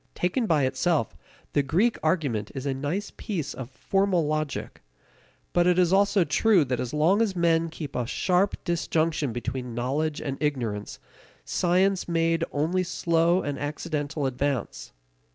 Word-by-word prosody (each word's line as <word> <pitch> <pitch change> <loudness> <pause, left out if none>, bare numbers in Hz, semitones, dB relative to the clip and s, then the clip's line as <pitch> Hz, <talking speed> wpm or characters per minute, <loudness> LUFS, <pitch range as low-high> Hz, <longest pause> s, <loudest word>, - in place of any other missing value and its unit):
Taken 215 +7 0
by 155 -6 +3
itself, 130 - 0 0.4
the 145 - +3
Greek 185 - +2
argument 125 - 0
is 135 0 -5
a 140 - 0
nice 145 +10 -3
piece 165 - -3
of 130 -2 -7
formal 195 +1 +1
logic. 155 -1 -3 0.7
But 175 0 +3
it 180 0 +4
is 180 0 +3
also 200 -1 +4
true 195 -2 +3
that 125 -2 -2
as 125 - -3
long 165 +8 +3
as 210 -4 +1
men 165 -1 +2
kept 155 -3 -7
a 125 -2 -1
sharp 185 +8 +1
disjunction 165 -4 0
between 120 +1 -4
knowledge 145 +6 -1
and 135 -2 -5
ignorance, 120 -9 -2 0.5
science 185 - +1
made 165 -1 +1
only 160 +6 0
slow 170 0 +1
and 145 -1 -3
accidental 150 0 -3
advance. 135 0 -2
160 Hz, 150 wpm, -26 LUFS, 140-180 Hz, 0.7 s, it